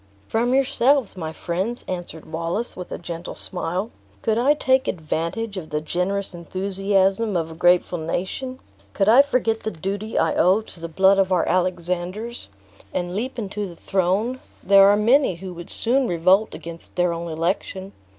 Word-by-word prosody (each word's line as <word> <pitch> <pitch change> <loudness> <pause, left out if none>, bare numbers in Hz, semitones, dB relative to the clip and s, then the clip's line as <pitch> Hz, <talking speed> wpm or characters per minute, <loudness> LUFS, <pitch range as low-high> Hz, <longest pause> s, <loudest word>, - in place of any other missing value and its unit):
"From 240 +3 +1
yourselves, 270 -3 +2
my 160 -4 -4
friends," 185 +9 -3
answered 175 -3 -5
Wallace, 170 +8 -3
with 180 - -8
a - - -3
gentle 170 0 -6
smile. 185 +4 -2 0.3
"Could 220 0 +1
I 280 +5 +4
take 260 -2 +2
advantage 170 +6 -3
of 165 -4 -6
the 150 - -1
generous 185 +5 -2
enthusiasm 195 +3 +1
of 165 -1 -2
a - - -9
grateful 175 +1 +3
nation; 190 +11 -3 0.4
could 195 - +1
I 235 +5 +8
forget 245 -5 0
the - - -2
duty 200 +4 -4
I - - +2
owe 190 +4 +4
to 215 - -9
the 165 - -5
blood 190 +4 +4
of 190 -1 +2
our 180 -2 +2
Alexanders, 180 - -2 0.4
and 175 0 -3
leap 250 +6 -3
into 205 -2 -3
the 175 - -10
throne, 195 +9 0 0.2
there 195 0 +7
are 205 +1 +5
many 235 0 +3
who 185 +1 -8
would 175 0 -9
soon 255 +2 +1
revolt 185 +5 +3
against 165 +1 -10
their 175 -1 +2
own 170 0 -5
election. 185 +3 -2
190 Hz, 170 wpm, -23 LUFS, 175-220 Hz, 0.4 s, I